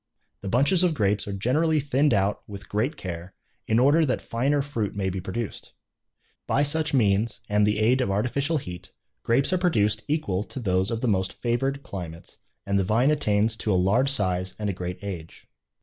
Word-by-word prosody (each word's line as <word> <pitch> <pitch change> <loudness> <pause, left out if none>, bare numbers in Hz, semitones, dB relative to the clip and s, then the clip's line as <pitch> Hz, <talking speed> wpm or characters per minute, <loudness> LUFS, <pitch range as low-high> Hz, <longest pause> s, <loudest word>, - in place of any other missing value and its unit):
The 100 - -5
bunches 140 - +4
of 175 -3 +2
grapes 105 -4 0
are - - -3
generally 150 +10 +1
thinned 140 +1 +2
out 100 -1 +1
with 100 -1 -9
great 120 +9 -1
care, 90 0 -7 0.3
in 110 - +2
order 145 +6 +5
that 130 -4 0
finer 140 +5 0
fruit 115 -9 -3
may 95 -2 -1
be 95 0 -4
produced. 110 +5 -5 0.7
By 145 - +2
such 155 +2 +1
means, 110 -3 +1
and 105 0 +2
the 105 0 +1
aid 120 +5 +3
of 125 - 0
artificial 125 +10 0
heat, 90 -6 -8 0.3
grapes 135 +9 +2
are 185 - +2
produced 110 - +2
equal 105 - -1
to - - -7
those 95 -3 +1
of 115 -1 -3
the 125 - 0
most 95 -3 0
favored 135 +4 -1
climates, 85 -6 -8 0.3
and 100 0 +1
the - - +2
vine 115 +9 +2
attains 110 -6 +1
to 110 - -1
a - - +3
large 105 +9 +3
size 95 -7 0
and 105 -2 -2
a - - -6
great 90 0 -5
age. 90 -5 -7
110 Hz, 195 wpm, -25 LUFS, 95-135 Hz, 0.7 s, order